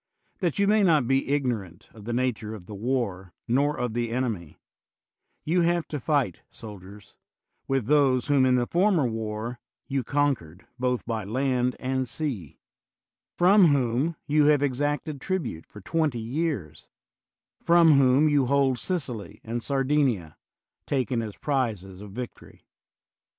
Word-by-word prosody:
That 175 Hz, -6 st, -1 dB
you 200 Hz, 0 st, +2 dB
may 215 Hz, +1 st, +4 dB
not 155 Hz, -10 st, +3 dB
be 135 Hz, +1 st, +1 dB
igno 135 Hz, -5 st, +1 dB
rant 90 Hz, -3 st, -15 dB
of 105 Hz, -2 st, -13 dB
the 120 Hz, -, -3 dB
nature 115 Hz, -3 st, -1 dB
of 95 Hz, -5 st, -11 dB
the 105 Hz, -, -9 dB
war 100 Hz, -5 st, -2 dB
nor 140 Hz, +5 st, +1 dB
of 125 Hz, -2 st, -2 dB
the 120 Hz, 0 st, -1 dB
enemy, 115 Hz, -10 st, -3 dB, 0.9 s
you 175 Hz, +3 st, +2 dB
have 170 Hz, 0 st, +1 dB
to 150 Hz, -, -3 dB
fight, 135 Hz, -, 0 dB
soldiers, 100 Hz, -1 st, -12 dB, 0.5 s
with 135 Hz, -4 st, 0 dB
those 135 Hz, -2 st, +3 dB
whom 140 Hz, -2 st, +3 dB
in 130 Hz, -1 st, +4 dB
the 125 Hz, -1 st, +2 dB
former 175 Hz, -1 st, +2 dB
war 110 Hz, +1 st, -4 dB, 0.3 s
you 135 Hz, -1 st, -2 dB
conquered 120 Hz, -, -1 dB
both 125 Hz, -1 st, -1 dB
by 115 Hz, -2 st, -2 dB
land 125 Hz, +3 st, 0 dB
and 130 Hz, -1 st, -2 dB
sea; 115 Hz, -, -4 dB, 0.8 s
from 185 Hz, +1 st, +6 dB
whom 140 Hz, +2 st, +1 dB
you 150 Hz, 0 st, +3 dB
have 145 Hz, -1 st, +4 dB
exacted 145 Hz, +1 st, -1 dB
tribute 155 Hz, -, -3 dB
for 105 Hz, -, -12 dB
twenty 155 Hz, -, 0 dB
years; 115 Hz, -, -3 dB, 0.7 s
from 170 Hz, -1 st, +5 dB
whom 135 Hz, +3 st, +4 dB
you 145 Hz, -4 st, +2 dB
hold 135 Hz, -2 st, +2 dB
Sicily 135 Hz, -, -3 dB
and 120 Hz, +1 st, -3 dB
Sardinia, 135 Hz, -, 0 dB, 0.5 s
taken 125 Hz, -4 st, 0 dB
as 110 Hz, -3 st, -6 dB
the -, -, -29 dB
prizes 105 Hz, -10 st, -2 dB
of 105 Hz, -, -9 dB
victory. 125 Hz, +4 st, -9 dB
130 Hz, 150 wpm, -26 LUFS, 110-145 Hz, 0.9 s, from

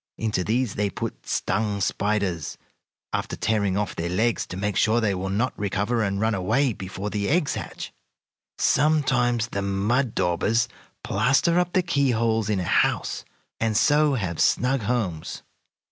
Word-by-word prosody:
Into 105 Hz, -4 st, -1 dB
these 115 Hz, +2 st, 0 dB
they 100 Hz, 0 st, 0 dB
put -, -, -6 dB
stung 105 Hz, -1 st, -1 dB
spiders, 100 Hz, -4 st, -1 dB, 0.6 s
after -, -, -2 dB
tearing 100 Hz, -3 st, 0 dB
off 105 Hz, -1 st, -2 dB
their 85 Hz, +1 st, -3 dB
legs 110 Hz, +6 st, 0 dB
to 90 Hz, -, -7 dB
make 100 Hz, 0 st, -2 dB
sure 110 Hz, +4 st, +3 dB
they 110 Hz, -4 st, +1 dB
will 95 Hz, +1 st, -3 dB
not 110 Hz, +7 st, 0 dB
recover 105 Hz, +4 st, 0 dB
and 100 Hz, -2 st, -1 dB
run 110 Hz, +2 st, +1 dB
away 115 Hz, +7 st, +1 dB
before 95 Hz, +1 st, -6 dB
the 100 Hz, -1 st, -1 dB
eggs 155 Hz, -1 st, +2 dB
hatch. -, -, -6 dB, 0.6 s
Sometimes 120 Hz, -6 st, +2 dB
the 100 Hz, -, -3 dB
mud 105 Hz, +6 st, 0 dB
daubers 110 Hz, +7 st, +1 dB, 0.4 s
plaster 165 Hz, +7 st, +2 dB
up 180 Hz, 0 st, -1 dB
the 185 Hz, -, +3 dB
keyholes 115 Hz, -, +1 dB
in 105 Hz, -3 st, +1 dB
a -, -, -1 dB
house, -, -, +1 dB, 0.3 s
and 110 Hz, -2 st, +1 dB
so 150 Hz, +3 st, +4 dB
have 90 Hz, -8 st, -2 dB
snug 130 Hz, +2 st, +2 dB
homes. 100 Hz, -8 st, -2 dB
110 Hz, 155 wpm, -24 LUFS, 100-125 Hz, 0.6 s, so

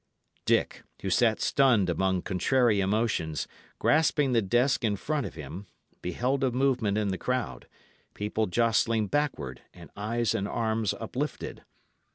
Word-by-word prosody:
Dick, -, -, +1 dB, 0.2 s
who 95 Hz, -, -1 dB
sat 110 Hz, +4 st, +3 dB
stunned 125 Hz, -9 st, +3 dB
among 95 Hz, +1 st, 0 dB
contrary 115 Hz, +3 st, +2 dB
emotions, 95 Hz, -6 st, 0 dB, 0.3 s
grasping 150 Hz, -3 st, +3 dB
the 115 Hz, -2 st, +3 dB
desk 120 Hz, +7 st, +2 dB
in 105 Hz, -3 st, +1 dB
front 145 Hz, +5 st, -2 dB
of -, -, -11 dB
him, 80 Hz, +6 st, -8 dB, 0.3 s
beheld 125 Hz, +10 st, -1 dB
a 130 Hz, -, +3 dB
movement 125 Hz, -5 st, +1 dB
in 105 Hz, -2 st, 0 dB
the 95 Hz, -, -3 dB
crowd, 125 Hz, -1 st, -2 dB, 0.5 s
people 105 Hz, +1 st, -1 dB
jostling 115 Hz, +2 st, +2 dB
backward, 105 Hz, -, -2 dB
and -, -, -13 dB
eyes 115 Hz, +3 st, -1 dB
and 100 Hz, -3 st, -1 dB
arms 110 Hz, -2 st, -1 dB
uplifted. -, -, -4 dB
110 Hz, 140 wpm, -28 LUFS, 95-125 Hz, 0.5 s, sat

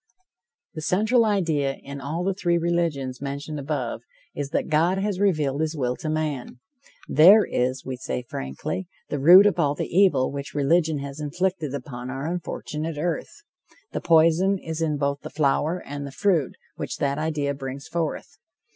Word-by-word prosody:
The 155 Hz, -, -6 dB
central 220 Hz, +8 st, +3 dB
idea 160 Hz, -10 st, +1 dB
in 140 Hz, 0 st, -9 dB
all 155 Hz, +6 st, -3 dB
the 195 Hz, +1 st, +1 dB
three 175 Hz, -3 st, +1 dB
religions 165 Hz, -7 st, -1 dB
mentioned 140 Hz, +2 st, -5 dB
above, 140 Hz, -4 st, -3 dB, 0.3 s
is 145 Hz, -1 st, -4 dB
that -, -, -1 dB
God 165 Hz, +4 st, +2 dB
has 195 Hz, -1 st, -1 dB
revealed 155 Hz, -8 st, +1 dB
his 160 Hz, 0 st, -1 dB
will 125 Hz, -2 st, 0 dB
to 155 Hz, -, -4 dB
man. 150 Hz, -6 st, -3 dB, 0.5 s
There 195 Hz, +8 st, +7 dB
is, 130 Hz, +1 st, -1 dB
we 130 Hz, -1 st, -4 dB
say 125 Hz, 0 st, -4 dB
frankly, 70 Hz, -, -4 dB, 0.2 s
the 145 Hz, -, -2 dB
root 180 Hz, +8 st, +9 dB
of 205 Hz, -3 st, +2 dB
all 145 Hz, -3 st, +2 dB
the -, -, -4 dB
evil 175 Hz, -10 st, +4 dB
which 140 Hz, 0 st, -6 dB
religion 155 Hz, +2 st, +2 dB
has 140 Hz, +1 st, -6 dB
inflicted 155 Hz, -1 st, -2 dB
upon 125 Hz, -2 st, -7 dB
our 135 Hz, +2 st, -4 dB
unfortunate 160 Hz, -2 st, -4 dB
earth. 175 Hz, -, -3 dB, 0.5 s
The -, -, -3 dB
poison 170 Hz, +4 st, +4 dB
is 160 Hz, -2 st, -5 dB
in 155 Hz, -2 st, 0 dB
both 140 Hz, 0 st, -1 dB
the -, -, -7 dB
flower 155 Hz, +3 st, +1 dB
and 145 Hz, 0 st, -5 dB
the -, -, -8 dB
fruit 165 Hz, -3 st, +1 dB, 0.2 s
which -, -, -4 dB
that 140 Hz, +1 st, -1 dB
idea 150 Hz, -2 st, -1 dB
brings 135 Hz, +1 st, -7 dB
forth. 165 Hz, -2 st, -3 dB
155 Hz, 170 wpm, -24 LUFS, 140-170 Hz, 0.5 s, root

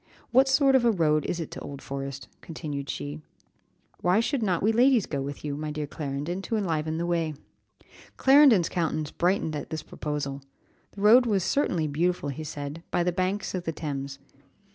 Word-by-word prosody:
What 265 Hz, +2 st, +5 dB
sort 270 Hz, 0 st, +4 dB
of 260 Hz, -2 st, +4 dB
a 235 Hz, -, +5 dB
road 155 Hz, -7 st, +2 dB
is 175 Hz, -, -2 dB
it 165 Hz, -, -5 dB
to -, -, -6 dB
Old 140 Hz, -1 st, -8 dB
Forest?" 135 Hz, -1 st, -6 dB
continued 145 Hz, -4 st, -6 dB
she; 75 Hz, +1 st, -5 dB, 0.8 s
"why 180 Hz, +4 st, +3 dB
should 255 Hz, +3 st, 0 dB
not 185 Hz, -5 st, 0 dB
we 215 Hz, -, +4 dB
ladies 245 Hz, -1 st, +4 dB
go 140 Hz, -2 st, -3 dB
with 140 Hz, +2 st, -6 dB
you, 145 Hz, -1 st, -2 dB
my 155 Hz, +1 st, -4 dB
dear 150 Hz, 0 st, -3 dB
Clarendon, 145 Hz, +5 st, -4 dB
to 225 Hz, -, -3 dB
enliven 160 Hz, -5 st, -1 dB
the 170 Hz, -, -1 dB
way." 165 Hz, -3 st, -1 dB, 0.8 s
Clarendon's 265 Hz, -, +6 dB
countenance 155 Hz, -3 st, -2 dB
brightened 175 Hz, -3 st, 0 dB
at 145 Hz, -, -5 dB
this 160 Hz, -1 st, -4 dB
proposal. 145 Hz, -2 st, -4 dB, 0.5 s
The 200 Hz, -, -9 dB
road 235 Hz, +4 st, +7 dB
was 200 Hz, -5 st, +1 dB
certainly 180 Hz, -, +1 dB
beautiful, 160 Hz, +1 st, 0 dB
he 140 Hz, +3 st, -5 dB
said, 145 Hz, +1 st, -6 dB
by 175 Hz, -, +1 dB
the 180 Hz, -, +1 dB
banks 185 Hz, +3 st, -1 dB
of 180 Hz, -2 st, -3 dB
the 165 Hz, -, -1 dB
Thames. 140 Hz, -3 st, -5 dB
165 Hz, 185 wpm, -27 LUFS, 145-195 Hz, 0.8 s, road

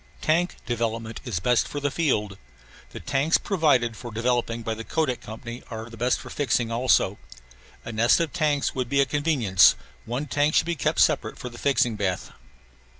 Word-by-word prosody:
Tank 170 Hz, +3 st, +1 dB
development 115 Hz, -1 st, -3 dB
is 110 Hz, -8 st, -2 dB
best 120 Hz, +5 st, +2 dB
for 145 Hz, -, -5 dB
the 145 Hz, 0 st, -1 dB
field. 105 Hz, -, -1 dB, 0.5 s
The -, -, -9 dB
tanks 140 Hz, +5 st, +1 dB
provided 145 Hz, -, +1 dB
for 120 Hz, +1 st, -8 dB
developing 115 Hz, 0 st, -1 dB
by 110 Hz, -, -2 dB
the 110 Hz, +1 st, -7 dB
Kodak 135 Hz, -2 st, -1 dB
Company 115 Hz, +3 st, -8 dB
are 110 Hz, -1 st, -6 dB
best 120 Hz, +2 st, 0 dB
for -, -, -10 dB
fixing 125 Hz, -5 st, 0 dB
also. 120 Hz, +2 st, +2 dB, 0.7 s
A -, -, -5 dB
nest 115 Hz, +2 st, +3 dB
of 165 Hz, -2 st, -1 dB
tanks 150 Hz, -5 st, 0 dB
would 130 Hz, -2 st, -3 dB
be 140 Hz, -, +1 dB
a 140 Hz, -, +5 dB
convenience; 135 Hz, -, +4 dB, 0.3 s
one 125 Hz, +5 st, -3 dB
tank 145 Hz, +2 st, +1 dB
should -, -, +4 dB
be 170 Hz, -, -1 dB
kept 160 Hz, -, -1 dB
separate -, -, +2 dB
for 125 Hz, -, -6 dB
the 120 Hz, -, -12 dB
fixing 125 Hz, -5 st, +1 dB
bath. 95 Hz, -3 st, -2 dB
125 Hz, 180 wpm, -25 LUFS, 115-145 Hz, 0.7 s, a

